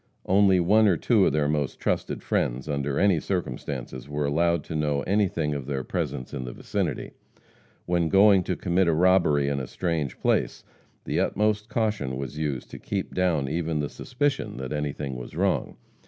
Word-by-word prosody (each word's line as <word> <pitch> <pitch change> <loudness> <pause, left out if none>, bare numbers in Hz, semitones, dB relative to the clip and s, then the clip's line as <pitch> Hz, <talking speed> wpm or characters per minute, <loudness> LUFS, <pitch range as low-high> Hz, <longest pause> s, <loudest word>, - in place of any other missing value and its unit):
Only 95 -1 +4
one 105 +5 +4
or 90 -4 +3
two - - +3
of - - +1
their 75 -1 +2
most 75 -2 -1
trusted - - -2
friends, 65 +4 -1
under 70 -1 -1
any 95 -5 +4
circumstances, 65 -6 -4
were 75 0 -1
allowed 85 +2 +1
to 80 - -6
know 75 -2 0
anything 90 -6 +1
of 70 -3 -5
their 70 -2 -2
presence 65 - -4
in 65 - -4
the 60 -1 -6
vicinity. - - -3 0.7
When 85 -2 +1
going 100 0 +6
to 90 - -1
commit 90 0 +1
a 85 - +3
robbery 85 -4 +3
in 70 -1 0
a 65 - -5
strange 80 -7 -2
place, - - 0 0.4
the - - -1
utmost 105 +1 0
caution 105 - -1
was 70 +2 -5
used 70 -5 -3
to - - -8
keep 100 -2 -4
down 85 -7 +1
even 80 +1 -1
the 75 -1 -2
suspicion 135 - -2
that 65 +2 -5
anything 75 -2 -3
was 60 - -9
wrong. - - 0
75 Hz, 180 wpm, -26 LUFS, 70-95 Hz, 0.7 s, going